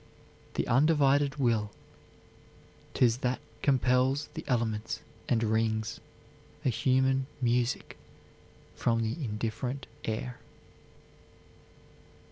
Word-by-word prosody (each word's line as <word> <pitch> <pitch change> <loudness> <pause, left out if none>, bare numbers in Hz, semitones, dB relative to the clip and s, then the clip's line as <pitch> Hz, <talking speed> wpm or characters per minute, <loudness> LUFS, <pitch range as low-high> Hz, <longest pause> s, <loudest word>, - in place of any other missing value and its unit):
"The - - 0
undivided 140 0 +4
will 115 -7 +1 1.3
'Tis 120 -2 +4
that 125 0 -1 0.2
compels 130 +1 +2
the - - -5
elements 115 -4 -1 0.3
and 115 -2 +2
wrings 110 0 0 0.7
A - - +4
human 130 +3 +2
music 125 0 0 0.7
from 115 -1 +1
the 110 0 -1
indifferent 115 +4 -3 0.2
air." 115 +3 -3
125 Hz, 85 wpm, -30 LUFS, 115-135 Hz, 1.3 s, undivided